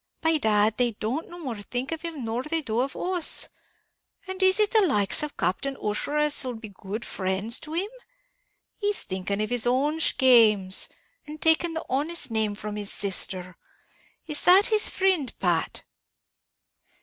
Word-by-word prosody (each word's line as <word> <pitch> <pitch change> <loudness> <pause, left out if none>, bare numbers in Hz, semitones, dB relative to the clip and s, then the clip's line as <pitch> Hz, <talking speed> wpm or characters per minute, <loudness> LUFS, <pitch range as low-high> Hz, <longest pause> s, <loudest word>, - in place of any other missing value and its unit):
By 320 -1 +2
dad, 215 -2 +2
they 245 -2 +1
don't 240 +10 -4
think - - -19
no 350 - -10
more 250 -5 -4
of 250 +9 -5
him 320 -7 -5
nor 225 +2 -2
they 320 +4 -2
do 230 -5 -3
of 265 +2 -2
us. 360 -2 +2 0.8
And 375 0 -6
is 375 +2 +4
it 425 -1 +2
the 440 - +4
likes 260 - +2
of 300 -1 -6
Captain 230 +10 -2
Ussher 210 +8 -3
as'll 290 -4 +1
be 220 -1 -10
good 200 +3 -7
frinds 195 +4 -2
to 305 - -9
him? 360 +5 -1 0.9
He's 410 0 +1
thinking 190 +1 -4
of 215 - -5
his 245 -1 +3
own 285 +6 0
schames, 220 -10 +3 0.4
and 305 +1 -9
taking 325 +1 +3
the 320 - -5
honest 290 0 0
name 215 -2 -1
from 210 0 -7
his 205 -1 -4
sister. 185 -2 -1 0.7
Is 300 -2 -3
that 380 +3 +6
his 430 -3 +3
frind, 370 -9 0
Pat?" 175 -3 -1
255 Hz, 165 wpm, -25 LUFS, 210-320 Hz, 0.9 s, that